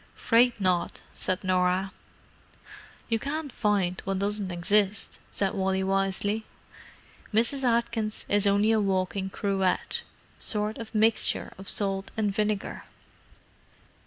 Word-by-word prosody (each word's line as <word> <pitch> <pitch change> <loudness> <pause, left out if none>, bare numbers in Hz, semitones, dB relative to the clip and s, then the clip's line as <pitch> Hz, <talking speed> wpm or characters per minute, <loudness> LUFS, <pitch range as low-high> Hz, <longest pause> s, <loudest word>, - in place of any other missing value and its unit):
"'Fraid 235 0 +3
not," 185 -3 0
said 185 +1 -1
Norah. 185 +1 +1 1.2
"You 225 -1 +1
can't 290 +2 -3
find 200 -5 0
what 195 0 -1
doesn't 200 0 0
exist," 200 +4 +1
said 195 -1 0
Wally 190 0 0
wisely. 195 +2 +1 0.9
"Mrs. 235 +5 +2
Atkins 235 -3 0
is 205 0 +3
only 205 +2 +4
a 220 - +3
walking 190 -1 0
cruet—sort 200 +2 -2
of 225 -1 -8
mixture 220 +1 +2
of 195 - -8
salt 195 -1 -1
and 210 -2 +1
vinegar." 210 0 -2
205 Hz, 110 wpm, -27 LUFS, 190-220 Hz, 1.2 s, only